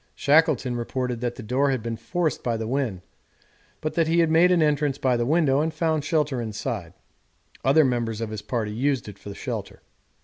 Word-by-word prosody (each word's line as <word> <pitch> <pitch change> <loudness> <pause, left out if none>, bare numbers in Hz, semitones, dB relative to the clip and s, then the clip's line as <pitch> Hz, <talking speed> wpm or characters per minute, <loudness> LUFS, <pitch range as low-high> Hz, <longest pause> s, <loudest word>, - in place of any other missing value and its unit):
Shackleton 145 -4 +3
reported 120 0 -3
that 120 -1 -2
the 125 - -8
door 130 +6 +1
had 130 -4 -1
been 115 -1 -3
forced 155 +7 -2
by 115 -2 0
the 110 - -3
wind, 120 -7 -1 0.8
but 155 - -2
that 165 -2 +2
he 165 +1 +2
had 165 -2 +3
made 170 +3 +5
an 175 -3 +4
entrance 145 -2 +1
by 130 -3 +1
the 120 0 0
window 150 -3 +3
and 160 +1 0
found 155 -1 0
shelter 150 -5 0
inside 110 -2 -4 0.7
other 140 +4 +5
members 120 -4 -1
of 115 -1 -4
his 110 -1 -5
party 110 0 -2
used 130 +1 0
it 100 -1 -10
for 100 - -8
shelter. - - -6
130 Hz, 200 wpm, -25 LUFS, 115-155 Hz, 0.8 s, made